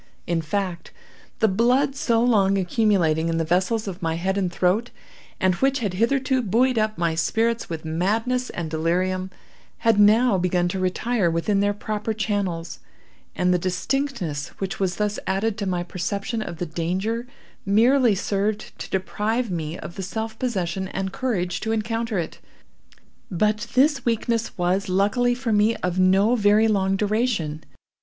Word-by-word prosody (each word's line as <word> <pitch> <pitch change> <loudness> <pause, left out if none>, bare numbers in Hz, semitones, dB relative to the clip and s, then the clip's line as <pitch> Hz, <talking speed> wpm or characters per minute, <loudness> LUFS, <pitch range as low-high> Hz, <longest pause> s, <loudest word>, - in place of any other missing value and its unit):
In 170 -1 0
fact, 180 +2 -3 0.5
the 220 - +5
blood 250 +7 +2
so 235 -5 +1
long 200 -5 +3
accumulating 175 -5 +2
in 165 - 0
the 165 - +1
vessels 185 +6 0
of 190 0 -6
my 165 -1 -1
head 190 +3 -1
and 190 -3 0
throat, 190 +7 +1 0.5
and 185 -1 +3
which 270 +9 +1
had 210 -8 -2
hitherto 260 +5 +1
buoyed 240 +3 +2
up 215 0 0
my 170 -1 +1
spirits 225 +8 0
with 165 -1 -5
madness 220 +10 0
and 165 -3 -5
delirium, 185 +4 0 0.6
had 225 -2 +4
now 215 0 +5
begun 180 0 +1
to 190 - -3
retire 185 +2 0
within 165 +5 0
their 205 0 +1
proper 215 +1 -3
channels, 200 -6 -2 0.6
and 180 0 +2
the 180 - +2
distinctness 185 - -2
which 195 -1 -4
was 190 -2 0
thus 210 0 -1
added 200 +3 0
to 200 - -2
my 180 -1 -1
perception 200 +5 -3
of 170 -6 -6
the 175 - -3
danger, 190 +9 -2 0.4
merely 230 +3 +4
served 205 +2 -2
to - - -6
deprive 210 +4 -1
me 160 -1 -3
of 170 - -9
the - - -3
self 220 +3 -5
possession 190 -6 -2
and 190 0 -4
courage 180 -9 -1
to 220 - -2
encounter 225 0 -1
it. 170 - -4 0.9
But 210 +4 0
this 275 0 +3
weakness 230 -1 -1
was, 185 +2 0
luckily 210 +6 +2
for 245 -3 -2
me, 210 +2 +3
of 180 0 -2
no 190 +5 +4
very 210 0 +4
long 195 -3 +1
duration. 205 -7 -1
200 Hz, 160 wpm, -23 LUFS, 180-225 Hz, 0.9 s, the